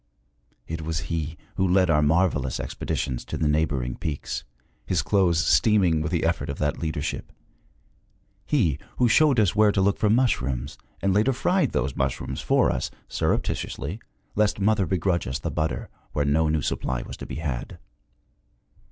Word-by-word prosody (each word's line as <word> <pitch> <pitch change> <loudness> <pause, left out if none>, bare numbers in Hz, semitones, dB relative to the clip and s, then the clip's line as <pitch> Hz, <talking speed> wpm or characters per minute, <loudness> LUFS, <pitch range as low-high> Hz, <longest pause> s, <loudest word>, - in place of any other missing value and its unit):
It 80 0 -5
was 80 0 -2
he 80 0 -3 0.2
who 95 0 +2
led 90 -1 +3
our 75 -1 +4
marvelous 75 -4 +1
expeditions 65 -2 -3
to - - -4
the 80 - +1
neighboring 70 -5 0
peaks, 75 -3 -4 0.4
his 85 -6 0
clothes 85 -2 +2
steaming 95 -8 +4
with 75 +1 -2
the 85 -3 +1
effort 80 -3 0
of 70 - -4
that 75 -1 -1
leadership 75 -2 -3 1.2
he 85 - +2 0.2
who 125 - +4
showed 135 +2 +4
us 100 -5 +3
where 105 -1 +5
to 100 - 0
look 100 +1 +2
for 105 - +2
mushrooms, 70 - 0 0.2
and 95 -1 +3
later 110 +7 +3
fried 180 +9 +1
those 65 +1 -1
mushrooms 70 0 -2
for - - +3
us, - - -2 0.2
surreptitiously, 80 +11 -2 0.3
lest 105 -1 +1
mother 100 -2 +2
begrudge 90 -1 0
us 65 +2 -2
the - - -4
butter 80 +1 -2 0.3
where 75 - 0
no 80 +2 +2
new 75 -1 0
supply 65 -2 -2
was - - -8
to - - -8
be - - -6
had. 70 -6 -4
80 Hz, 165 wpm, -25 LUFS, 75-100 Hz, 1.2 s, where